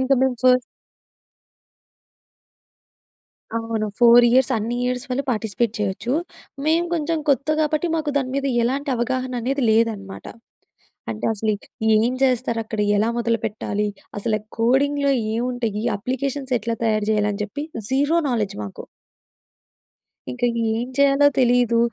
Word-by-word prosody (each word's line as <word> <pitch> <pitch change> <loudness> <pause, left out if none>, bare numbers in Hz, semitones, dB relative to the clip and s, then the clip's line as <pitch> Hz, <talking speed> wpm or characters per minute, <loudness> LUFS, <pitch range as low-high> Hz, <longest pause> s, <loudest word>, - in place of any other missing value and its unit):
ఇంకా 260 +1 +3
మేము 260 -2 +1
ఫస్ 255 -1 +5 2.9
అవును. 225 -1 -2
4 240 0 +7
ఇయర్స్ 255 +1 +3
అన్నియర్స్ 245 +3 -2
వాళ్ళు 255 +3 -1
పార్టిసిపేట్ 220 0 -1
చేయొచ్చు. 210 +5 -2 0.5
మేం 325 +2 +3
కొంచెం 325 0 0
కొత్త 275 +1 +2
కాబట్టి, 310 +2 0
మాకు 310 -2 -1
దాని 260 -2 -2
మీద 275 0 -1 0.2
ఎలాంటి 275 +4 -1
అవగాహననేది 255 +2 -1
లేదనమాట. 220 -3 -1 0.9
అంటే, 110 - -4
అసలి 215 0 -1 0.4
ఏం 235 +4 +2
చేస్తారక్కడ 230 -4 0 0.2
ఎలా 220 +3 +2
మొదలుపెట్టాలి? 215 -2 -1 0.3
అసల 215 +1 0 0.2
కోడింగ్‌లో 280 +4 +2 0.2
ఏముంటాయి? 235 -3 -2
అప్లికేషన్స్ 265 +3 -3
ఎట్లా 230 +2 -2
తయారు 215 -2 +1
చేయాలని 210 -1 0
చెప్పి 215 +8 -5 0.3
జీరో 285 +5 +2
నాలెడ్జ్ 220 -5 -1
మాకు. 100 - -8 1.5
ఇంకా 125 - -1 0.3
ఏం 240 - -3
చేయాలో 280 +1 +5
తెలీదు. 245 -2 +3
245 Hz, 110 wpm, -22 LUFS, 220-270 Hz, 2.9 s, 4